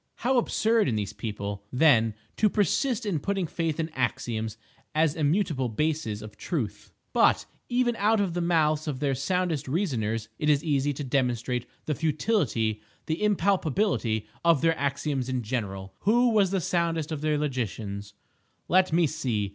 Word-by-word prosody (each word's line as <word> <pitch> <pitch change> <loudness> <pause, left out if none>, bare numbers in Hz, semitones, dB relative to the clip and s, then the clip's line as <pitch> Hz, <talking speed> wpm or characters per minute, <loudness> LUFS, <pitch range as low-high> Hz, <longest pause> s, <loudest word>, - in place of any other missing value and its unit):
How 255 +3 +1
absurd 225 -2 +2
in 120 - 0
these 105 -2 -2
people, 100 -2 -5
then, 125 -6 +4 0.2
to 215 - +4
persist 225 - +1
in 185 -7 0
putting 195 +4 -1
faith 165 -1 -2
in 160 0 -1
"axioms" 115 -6 -2 0.4
as 155 -1 +3
immutable 155 -4 +1
bases 115 -4 -1
of 105 -1 -11
Truth! 135 - -4 0.2
But - - +4 0.2
even 245 -1 +2
out 215 +2 +3
of 195 -4 0
the 175 - -1
mouths 155 -3 +2
of 140 -4 -2
their 140 -1 +1
soundest 165 +1 -1
reasoners 115 - -1
it 150 - +1
is 145 0 +3
easy 145 -3 +1
to 145 - -5
demonstrate 125 -2 -1 0.2
the 155 - 0
futility, 150 - 0 0.2
the 160 +4 -2
impalpability 190 - +1 0.2
of 170 -4 +4
their 165 0 +3
axioms 140 -2 -1
in 130 -2 -1
general. 95 -5 -4
Who 240 +4 +4
was 210 -4 +3
the 190 -1 0
soundest 165 -2 0
of 155 -2 -3
their 155 -1 +1
logicians? 105 -8 -3 0.5
Let 185 0 +4
me 170 +1 +4
see! 110 -8 -1
150 Hz, 160 wpm, -27 LUFS, 120-180 Hz, 0.5 s, then